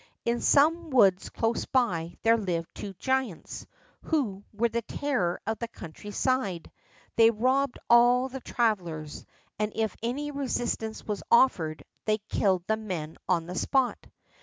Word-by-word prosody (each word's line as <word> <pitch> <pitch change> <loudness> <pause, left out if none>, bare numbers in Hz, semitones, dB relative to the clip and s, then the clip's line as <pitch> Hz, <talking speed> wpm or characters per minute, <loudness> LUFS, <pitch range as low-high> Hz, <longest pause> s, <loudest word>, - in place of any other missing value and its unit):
In 235 0 0
some 325 +4 +4
woods 200 -9 +4
close 225 +1 -1
by 175 -10 0
there 230 0 +5
lived 175 -6 -2
two 200 -1 -7
giants, 260 -6 -2 0.4
who 220 - -1
were 220 +3 +1
the 235 0 -2
terror 225 -8 -1
of 220 0 -2
the 235 - -3
country 185 -2 -10
side; 205 -6 -1 0.5
they 225 0 +7
robbed 255 +4 +1
all 245 +2 +5
the 265 0 -7
travelers, 175 -12 -2 0.3
and 210 0 0
if 220 -3 -1
any 275 +6 -2
resistance 240 -5 -2
was 210 -2 -3
offered 170 -11 +3 0.2
they 215 0 +2
killed 195 -3 0
the 220 +2 +1
men 175 -8 -5
on 170 -3 +2
the 180 - -6
spot. 260 +6 0
225 Hz, 145 wpm, -28 LUFS, 185-255 Hz, 0.5 s, they